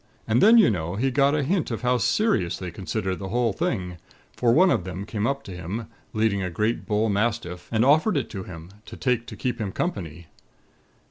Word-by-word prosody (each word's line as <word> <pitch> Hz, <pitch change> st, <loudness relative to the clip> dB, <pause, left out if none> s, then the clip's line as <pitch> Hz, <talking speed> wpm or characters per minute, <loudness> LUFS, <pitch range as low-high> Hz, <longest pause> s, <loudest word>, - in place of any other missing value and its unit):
And 110 Hz, +3 st, +3 dB
then, 225 Hz, +3 st, +7 dB
you 210 Hz, -, +6 dB
know, 85 Hz, -2 st, -3 dB
he 130 Hz, +6 st, 0 dB
got 140 Hz, +2 st, +3 dB
a 150 Hz, -, +1 dB
hint 175 Hz, +4 st, 0 dB
of 115 Hz, +1 st, -4 dB
how 125 Hz, 0 st, +2 dB
serious 110 Hz, -, +1 dB
they 90 Hz, -2 st, -6 dB
considered 95 Hz, +1 st, -3 dB
the 95 Hz, -1 st, -5 dB
whole 120 Hz, -1 st, +1 dB
thing; 95 Hz, -, -2 dB, 0.4 s
for 120 Hz, -2 st, +2 dB
one 180 Hz, +8 st, +5 dB
of -, -, +1 dB
them 95 Hz, +2 st, -6 dB
came 105 Hz, 0 st, -2 dB
up 140 Hz, +1 st, -2 dB
to -, -, -9 dB
him, 90 Hz, +6 st, -5 dB, 0.3 s
leading 110 Hz, -2 st, +1 dB
a 90 Hz, -, -2 dB
great 105 Hz, +7 st, -1 dB
bullmastiff, 105 Hz, -3 st, -1 dB
and 115 Hz, +1 st, +2 dB
offered 155 Hz, +6 st, +4 dB
it 135 Hz, -, -1 dB
to 95 Hz, -, -5 dB
him, 85 Hz, -1 st, -10 dB, 0.2 s
to -, -, -9 dB
take 125 Hz, -3 st, 0 dB
to -, -, -8 dB
keep 125 Hz, -3 st, -3 dB
him 100 Hz, -3 st, -2 dB
company. 85 Hz, -, -4 dB
110 Hz, 210 wpm, -25 LUFS, 95-130 Hz, 0.4 s, then